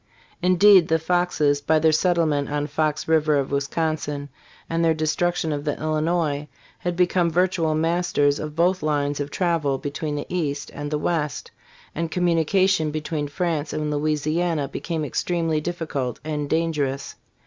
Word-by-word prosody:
Indeed, 185 0 +6
the 160 - +3
Foxes 160 -4 +1
by 155 +2 +2
their 160 +1 +4
settle 170 +1 +2
ment 145 -2 0
on 145 0 -1
Fox 150 0 -1
river 155 -2 +3
of 140 -1 -1
Wisconsin 145 0 -2 0.4
and 165 0 0
their 165 -1 +3
destruction 160 +1 0
of 145 -1 -3
the 145 -1 -2
Illinois, 155 -1 0 0.3
had 175 0 -2
be 180 +1 +4
come 175 -1 +1
virtual 170 -2 +1
masters 160 -3 +1
of 150 -1 -5
both 180 +3 +2
lines 145 -1 0
of 145 0 -3
travel 165 -6 0
between 150 +2 -4
the 145 - -4
east 145 -5 -3
and 145 0 -5
the 150 - -1
west, 150 -1 -2 0.4
and 165 +1 -2
communication 175 0 +2
between 150 0 -3
France 160 -1 -2
and 150 -1 -2
Louisiana 155 +1 0
became 160 +2 -3
extremely 165 +1 -1
difficult 155 -7 -3
and 150 -2 -3
dangerous. 150 -5 -1
155 Hz, 155 wpm, -23 LUFS, 145-170 Hz, 0.4 s, Indeed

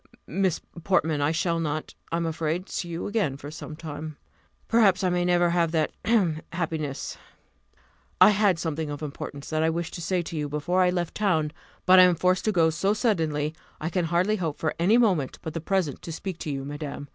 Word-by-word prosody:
"Miss 185 +1 0 0.2
Portman, 160 -6 +2
I 145 +2 +2
shall 165 +1 0
not, 155 -1 -3 0.2
I 165 - +1
am 170 - -1
afraid, 165 +2 -2
see 175 - -3
you 170 0 -4
again 200 -11 0
for 145 +1 -8
some 155 0 -8
time; 155 -1 -7 0.5
perhaps 210 -5 +4
I 185 - +3
may 175 0 +1
never 175 -1 +3
have 170 -2 +2
that 155 -2 +1
hem! 185 -9 +2
happiness. 160 -5 -3 1.0
I - - +9
had 200 -3 +3
something 160 -2 -3
of 145 +1 -5
importance 140 -1 -6
that 155 0 +1
I 160 - +3
wished 165 +1 -3
to 175 - -6
say 175 +1 0
to 165 - -7
you 150 -2 -2
before 150 +6 0
I 180 - +4
left 175 -2 -1
town; 160 -8 +1 0.3
but 185 0 +8
I - - +10
am 180 -1 +4
forced 185 +2 +1
to 215 - +3
go 165 -4 +3
so 195 +6 +1
suddenly, 160 - 0 0.3
I 160 +2 -3
can 180 0 0
hardly 180 +6 +1
hope 160 -6 -2
for 155 - -1
any 195 +7 +4
moment 185 - +2
but 160 - -5
the 165 - -3
present 180 -4 -1
to 165 - -7
speak 175 +1 -5
to - - -4
you, 135 -1 -3
madam. 145 0 -6
165 Hz, 215 wpm, -26 LUFS, 155-185 Hz, 1.0 s, I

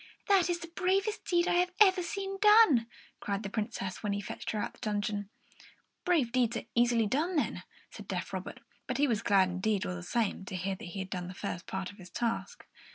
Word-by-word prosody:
"That 380 -3 +5
is 350 - +1
the 335 - -6
bravest 385 +5 0
deed 345 -1 +2
I - - +2
have 360 0 +1
ever 380 -3 +6
seen 390 +3 -4
done!" 420 - +7 0.3
cried 200 +1 -3
the 195 - -5
Princess, 205 -3 -3
when 205 -1 -1
he 200 - -1
fetched 200 - -6
her 215 - -2
out - - -1
of - - -26
her - - -23
dungeon. 205 -1 -2 0.8
"Brave 315 -10 +2
deeds 240 -2 +2
are - - -4
easily 235 -1 +3
done, 305 - 0
then," 295 - 0 0.3
said - - -10
deaf - - -4
Robert; - - -5 0.3
but - - -1
he 290 +1 +3
was 225 -5 0
glad 190 -2 +4
enough, 215 -3 +1
all 90 - -2
the 90 - -6
same, 220 - -1
to 190 - -6
hear 190 +2 -2
that 190 - -8
he 175 +3 -8
had 190 -1 -5
done 180 -1 -3
the 180 - -8
first 175 - -5
part 190 -1 -4
of 200 - -18
his 180 -1 -11
task. 230 +2 -3
230 Hz, 230 wpm, -31 LUFS, -, 0.8 s, done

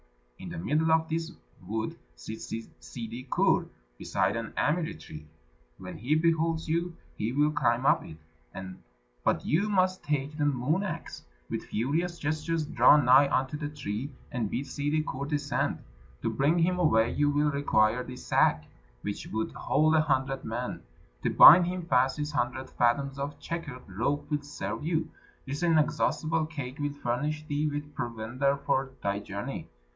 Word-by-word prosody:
In - - -7
the - - -6
middle 155 - +1
of 160 0 +3
this 165 +1 -2 0.3
wood 110 +4 -3 0.2
sits - - -8
Ssidi 115 +2 -7
Kur, - - +2 0.3
beside - - 0
an 115 -1 -4
amiri 160 +2 0
tree. 75 0 -10 0.5
When 90 0 -8
he 130 +8 +1
beholds 165 0 +1
you, 170 +2 -1 0.2
he 110 +2 -2
will 145 +3 +2
climb 125 -3 +1
up - - +4
it, 80 - -10 1.1
but - - +1
you 195 +7 +1
must 185 -2 +1
take 145 0 -2
the 150 -1 0
moon 145 +5 +1
axe, 165 -5 -5 0.3
with - - -3
furious 165 +10 -1
gestures 155 +1 -1
draw 145 - +6
nigh 135 0 +6
unto 130 +3 0
the 150 -1 -4
tree, 130 -3 -4 0.2
and 115 -4 -2
bid 135 - -2
Ssidi 145 +3 -1
Kur 140 +1 -4
descend. 145 -1 -1 0.4
To - - 0
bring 145 +5 +2
him 180 +2 +2
away 115 -9 +3
you 145 0 +2
will 145 +1 +2
require 125 -4 +2
this 125 0 -9
sack, 75 0 +3 0.4
which 100 -1 -4
would 110 +1 -2
hold 155 +1 +2
a 160 - +5
hundred 135 -2 0
men. - - -4 0.4
To - - +1
bind 175 +3 +9
him 180 0 -3
fast 130 -2 +2
this 150 0 -3
hundred 130 -1 -2
fathoms 135 +3 +1
of 140 +1 -4
checkered 145 -7 -6
rope 125 - -2
will 150 -1 0
serve 145 +1 -5
you. 160 0 -1 0.3
This 140 +3 -4
inexhaustible 160 -1 +1
cake 140 -4 -6
will 145 0 -1
furnish 145 +3 -2
thee 150 +1 -1
with 145 0 -5
provender 120 +4 -1
for 135 -1 0
thy 100 0 0
journey. 105 - -6
145 Hz, 160 wpm, -29 LUFS, 125-155 Hz, 1.1 s, bind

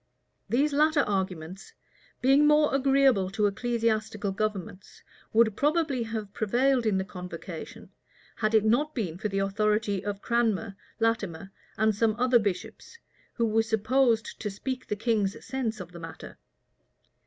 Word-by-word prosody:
These 285 +5 +2
latter 305 +1 +4
arguments, 190 - -3 0.5
being 275 +3 +5
more 300 -1 +4
agreeable 270 -7 +3
to 210 +2 0
ecclesiastical 220 -1 -1
governments, 195 -2 -5 0.3
would 220 -2 +3
probably 295 -3 +1
have 220 -3 -5
prevailed 245 +3 +1
in 200 -3 +2
the 190 - 0
convocation, 180 -2 -8 0.5
had 215 0 +1
it 215 -1 +4
not 290 +8 +2
been 180 -8 -3
for 210 - -1
the 195 - -3
authority 205 0 0
of 205 0 -4
Cranmer, 225 -4 0 0.2
Latimer, 200 -6 -1 0.3
and 220 0 +3
some 215 +1 +1
other 250 0 +4
bishops, 205 - -4 0.4
who 235 - 0
were 225 0 +2
supposed 225 +1 +1
to 210 - -2
speak 255 +6 -5
the 210 - -1
king's 205 -2 -1
sense 240 -4 -3
of 180 -1 -8
the 170 - -10
matter. 165 -1 -10
220 Hz, 140 wpm, -27 LUFS, 200-250 Hz, 0.5 s, being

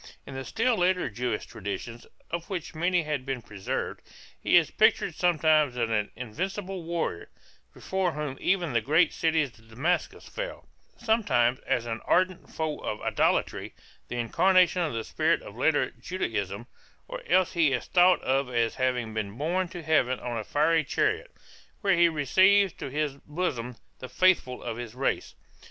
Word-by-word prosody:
In 140 - -9
the 135 0 -5
still 230 - +1
later 180 -6 +1
Jewish 120 0 -2
traditions, 105 +4 -6 0.2
of 170 0 -4
which 180 -5 -4
many 175 +2 +1
have 150 -3 -2
been 130 -3 -4
preserved, 100 -2 -4 0.4
he - - +5
is - - +3
pictured - - +3
sometimes 155 -6 +2
as 115 -2 0
an 105 -2 0
invincible 185 - -4
warrior, 165 - -3 0.4
before 190 -3 -2
whom 150 -2 -4
even 175 -7 +1
the 115 - +2
great 155 +10 +3
city 160 -1 +2
of 135 -5 -6 0.2
Damascus 155 +11 -1
fell, - - -6 0.3
sometimes 205 - +2
as 120 - +1
an 115 -1 -4
ardent 185 0 +1
foe 155 -2 -3
of 105 - -4
idolatry, - - 0 0.3
the 125 - -5
incarnation 180 +8 +3
of 160 -5 -1
the 115 -1 -2
spirit - - 0
of - - -10
later - - +2
Judaism, 110 - -4 0.4
or - - -6
else 185 -1 +3
he 165 -5 +3
is 125 - -1
thought 180 0 +4
of 135 0 +1
as 115 -2 +1
having 125 -3 -1
been 105 -1 -4
borne 175 +6 0
to 175 0 -8
heaven 130 -5 +2
on 120 -1 -4
a 110 - -3
fiery 155 +6 +2
chariot, - - 0 0.5
where 195 -3 +3
he 170 0 +5
receives 190 +6 +4
to - - -7
his 145 0 -2
bosom 135 -7 -3 0.2
the 130 - -8
faithful 130 -4 +2
of 110 - -4
his 120 -1 -7
race. 135 - -2
150 Hz, 165 wpm, -27 LUFS, 120-180 Hz, 0.5 s, he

